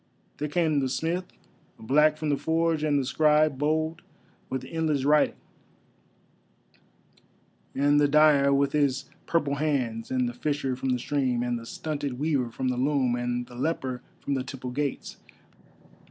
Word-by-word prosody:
There 150 - -2
came 155 -2 +1
the 135 -1 -1
smith, 165 +7 -1 0.5
black 150 +6 +3
from 155 -1 -2
the 145 - +3
forge, 160 +1 0
and 150 -2 +2
the 135 - 0
scribe 150 0 +3
bowed 155 +2 0 0.5
with 130 -1 -3
endless 155 -3 -1
writing; 150 +1 +4 2.4
and 145 +2 +3
the 145 - +4
dyer 145 -1 +5
with 140 0 +2
his 140 -2 +1 0.2
purple 145 -4 0
hands, 130 -7 -1
and 130 -1 0
the 120 - -4
fisher 140 -1 -2
from 130 +1 -3
the 125 - +2
stream; 125 -2 0
and 120 -1 -1
the 115 - -11
stunted 145 -4 -4
weaver 140 -4 0
from 130 +2 -2
the 125 - -1
loom, 130 -2 +1
and 120 0 -2
the 120 - -15
leper 130 -2 -2 0.2
from 140 - -2
the 130 -2 -1
Temple 130 -1 -7
gates. 140 +1 -3
140 Hz, 155 wpm, -27 LUFS, 130-150 Hz, 2.4 s, dyer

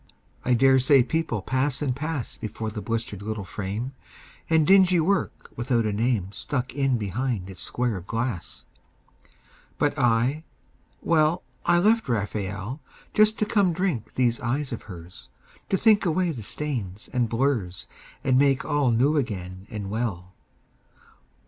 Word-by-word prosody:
I 125 - +3
dare 130 +2 +5
say 130 0 +5
people 130 - -1
pass 130 +3 +1
and 135 -4 -1
pass 150 -3 -2
Before 110 0 -4
the 105 0 -5
blistered 115 -3 -3
little 105 -1 -4
frame, 105 +7 -4 0.6
And 160 -1 +4
dingy 185 -1 +6
work 190 +4 -1
without 120 -1 0
a 105 - 0
name 110 -3 0
Stuck 125 +3 -3
in 135 -2 +1
behind 105 -1 -2
its 95 - -9
square 120 -4 -1
of 90 +1 -10
glass. 115 -5 -3 1.1
But 145 - +2
I, 125 +5 +2 0.6
well, 160 +1 +2 0.2
I 175 - +5
left 215 - +3
Raphael 105 +3 -3 0.3
Just 215 +1 +4
to 215 - +1
come 200 -5 +2
drink 160 - -2
these 120 -2 +2
eyes 130 +2 -2
of 115 - -5
hers, 90 -1 -11 0.4
To 195 - +2
think 215 0 +4
away 175 0 +1
the 125 -7 -6
stains 110 -6 -4
and 120 -3 +1
blurs 115 -7 -1 0.4
And 130 -1 +3
make 140 -1 +3
all 145 -3 +2
new 130 +7 +3
again 95 -7 -4
and 100 -2 -5
well. 100 -5 -3
125 Hz, 150 wpm, -25 LUFS, 105-150 Hz, 1.1 s, dingy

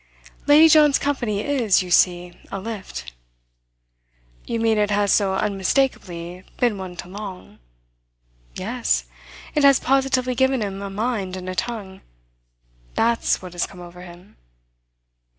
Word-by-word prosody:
Lady 300 +2 +8
John's 300 -3 +6
company 240 -8 -1
is, 230 -8 +2
you 180 - -8
see, 175 0 +3 0.2
a 195 - -3
lift." 190 - -7 1.3
"You 230 - -2
mean 225 -1 +2
it 210 0 +2
has 205 -1 +2
so 195 -2 +2
unmistakably 190 -4 -1
been 235 -5 +1
one 185 -2 -7
to 175 - -8
Long?" 195 -1 -9 1.0
"Yes - - -1 0.5
it 295 - +1
has 275 -2 +6
positively 265 -1 +1
given 265 -1 +2
him 195 -1 -5
a 200 - -5
mind 205 -2 -2
and 185 0 -8
a 185 - -3
tongue. 200 -3 -5 0.9
That's 230 -4 +1
what 180 -1 -9
has 175 - -1
come 180 - -14
over 175 0 -11
him." 180 +1 -14
205 Hz, 135 wpm, -22 LUFS, 185-245 Hz, 1.3 s, Lady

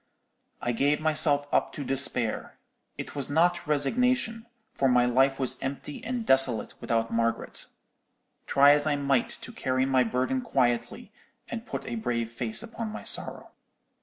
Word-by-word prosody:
"I 120 - 0
gave 140 +5 +1
myself 150 -2 +1
up - - +1
to 145 - -6
despair; 130 -4 +2 0.4
it - - -7
was 140 -2 -4
not 175 +3 +1
resignation, 225 - 0 0.3
for 135 - +1
my 125 -1 +4
life 135 +2 +2
was 130 -1 -1
empty 140 +2 -6
and 240 -1 -4
desolate 135 - +4
without 115 0 -1
Margaret; 115 0 -2 0.8
try 140 +1 +6
as 145 +1 +2
I 150 - +1
might 140 -3 0
to - - -8
carry 130 0 -1
my 130 -1 +2
burden 125 - -1
quietly, 125 - -1 0.4
and - - -6
put - - -5
a 120 - -4
brave 115 0 -2
face 115 - -1
upon 230 0 -6
my 215 - -8
sorrow. - - -3
135 Hz, 155 wpm, -27 LUFS, 125-155 Hz, 0.8 s, try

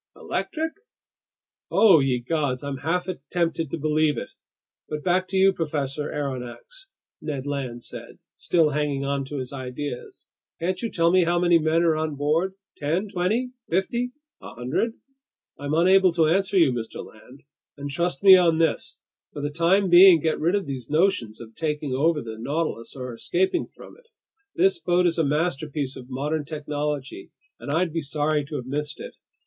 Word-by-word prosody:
"Electric?" 320 +1 -3 1.0
"Oh 195 -8 +6
ye 135 -2 +1
gods, 140 -2 -1
I'm 140 -1 -4
half 175 +6 -1 0.2
tempted 165 -3 0
to 165 - -3
believe 155 -2 +1
it! - - -5 0.6
But 150 -1 -4
back 185 +1 +1
to 190 - -2
you, 195 0 +5
Professor 150 -3 -3
Aronnax," 140 - -6 0.3
Ned 140 -3 -4
Land 130 -4 -4
said, - - -8 0.2
still 160 -4 +2
hanging 145 -1 -1
on 140 0 -1
to 145 +2 -6
his 130 +1 -5
ideas. 130 0 -6 0.3
"Can't 180 +2 -2
you 230 - -2
tell 170 -3 +2
me 185 -1 +4
how 175 +1 +1
many 175 -1 +4
men 160 +2 +2
are 165 -2 +3
on 155 -1 -2
board? 160 +7 0 0.2
Ten, 165 +8 -1
twenty, 215 +8 -1 0.2
fifty, 235 +8 0 0.3
a - - -10
hundred?" 130 - -1 0.7
"I'm 145 +2 -2
unable 185 +2 +5
to 165 -2 +3
answer 190 +4 +2
you, 165 -7 +5
Mr. 115 -2 -5
Land. 125 +5 -16 0.3
And 145 0 -5
trust 170 +1 -2
me 190 -1 +10
on 170 -3 +4
this: 165 0 -1 0.3
for 145 - -6
the 145 - -2
time 175 +5 +3
being, 175 -1 +9
get 160 +1 0
rid 170 +5 +2
of 200 - -1
these 130 -4 -6
notions 150 - +1
of 115 -1 -11
taking 150 -1 -2
over 150 +3 +1
the 110 -1 -8
Nautilus 140 -1 -3
or 125 -2 -6
escaping 185 - 0
from - - -14
it. 485 -1 -23 0.5
This 380 0 +3
boat 180 +1 +2
is 170 -1 +1
a - - +3
masterpiece 150 -2 -1
of 125 0 -11
modern 150 +4 -2
technology, 150 - -4 0.3
and - - -8
I'd 165 +1 +1
be 165 - -1
sorry 150 +1 0
to 150 +1 -7
have 130 -4 -4
missed 150 +3 -4
it! - - -9
155 Hz, 175 wpm, -24 LUFS, 140-175 Hz, 1.0 s, me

